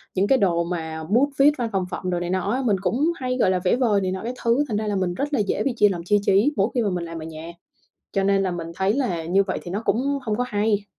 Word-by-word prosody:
những 195 +2 +2
cái 270 - +4
đồ 175 -6 +2
mà 160 -2 -4
bút 240 - +2
viết, 285 +2 +7
văn 240 -3 -2
phòng 190 -3 0
phẩm 185 - -4
đồ 175 -1 0
này 175 0 -3
nọ 185 +2 -1
á, 255 +3 0
mình 210 -4 +3
cũng 245 - +1
hay, 255 -4 -3
gọi 230 - +3
là, 185 - +1
vẽ 185 - +3
vời 225 -6 +2
này 185 -1 -1
nọ 190 - -4
các 240 +2 -3
thứ, 235 +5 +3
thành 215 - -1
ra 215 0 -2
là 205 - -1
mình 185 -2 0
rất 285 +9 -3
là 275 - +2
dễ 205 - 0
bị 270 - 0
chia 210 - +5
làm 175 -3 -4
chia 205 +4 +3
trí 205 +10 +3
mỗi 200 0 +2
khi 245 - +1
mà 215 - +1
mình 180 -2 -3
làm 165 0 -7
ở 155 - -7
nhà, 160 +1 -8 0.6
cho 195 - +1
nên 195 0 +3
là 190 - 0
mình 170 -1 -5
thấy 190 +1 +1
là 220 -11 -1
như 185 +4 +3
vậy 195 - -3
thì 175 - -8
nó 200 +4 -3
cũng 280 +4 0
không 215 -3 -1
có 250 - 0
hay. 210 -2 0
200 Hz, 310 wpm, -23 LUFS, 180-235 Hz, 0.6 s, viết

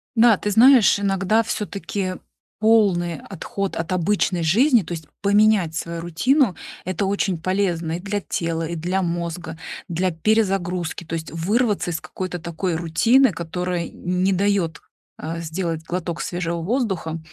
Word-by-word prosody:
Да, 230 -2 +6
ты 205 - -2
знаешь, 235 -1 +6
иногда 200 +2 +2
всё-таки 200 -3 -3 0.4
полный 200 -7 +3
отход 195 +1 -5
от 165 +1 -3
обычной 185 0 +1
жизни, 230 - +4
то 175 -1 -6
есть 160 -2 -6 0.2
поменять 205 -4 +3
свою 170 0 -4
рутину- 200 - +2 0.3
это 185 +2 -1
очень 195 -2 0
полезно 175 -2 -1
и 170 - -2
для 205 +2 -2
тела, 165 -3 -2
и 170 - -4
для 180 +4 -1
мозга, 170 -1 -4 0.3
для 180 +1 0
перезагрузки, 180 -2 0
то 165 - -9
есть 165 -1 -3
вырваться 205 +3 0
из 165 - -3
какой-то 185 -1 -5
такой 170 +2 -3
рутины, 220 +11 +3
которая 175 0 -3
не 180 +2 -1
дает, 185 -5 0 0.4
э, 165 +1 -4
сделать 165 0 -3
глоток 170 0 -4
свежего 170 -1 -3
воздуха, 190 -7 -1
180 Hz, 140 wpm, -22 LUFS, 165-205 Hz, 0.4 s, Да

